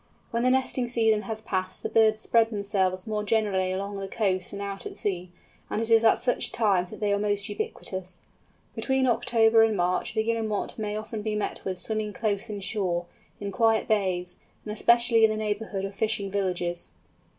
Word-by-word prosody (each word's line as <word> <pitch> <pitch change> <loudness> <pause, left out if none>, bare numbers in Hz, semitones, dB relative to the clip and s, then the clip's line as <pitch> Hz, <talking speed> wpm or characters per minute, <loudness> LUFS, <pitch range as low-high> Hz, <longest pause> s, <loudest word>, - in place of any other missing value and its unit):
When 235 - 0
the 250 - +3
nesting 255 -1 +1
season 225 -3 +2
has 220 0 -3
passed 185 -3 -3
the - - 0
birds 220 -1 +3
spread 230 0 +3
themselves 195 -3 0
more 215 -1 -2
generally 205 -4 +1
along 200 +2 -3
the 195 - -4
coast 190 -3 -1
and 200 - -6
out 200 -1 -5
at - - -8
sea, 180 -3 -2 0.4
and - - -1
it 225 0 -1
is 225 0 +6
at 225 - +5
such 245 - 0
times 195 -6 +2
that - - -9
they 205 -1 +1
are 200 - +1
most 205 -1 +1
ubiquitous. 185 -2 -5 0.5
Between 265 -1 +1
October 230 -2 +4
and 220 -2 +3
March 180 +6 0
the 220 - +2
Guillemot 220 -2 -2
may 210 -1 -2
often 215 0 -5
be 215 0 -2
met 210 - -3
with 185 -1 -3
swimming 215 +2 -2
close 210 0 -1
in 205 -1 -5
shore, 185 -3 -1 0.3
in 200 -1 -4
quiet 225 +2 +2
bays, 185 -4 0 0.3
and 210 - -4
especially 235 +1 +4
in 220 - +7
the 215 - -1
neighbourhood 210 -2 -2
of 195 - -6
fishing 210 -1 -1
villages. 180 -3 -2
210 Hz, 195 wpm, -27 LUFS, 195-225 Hz, 0.5 s, in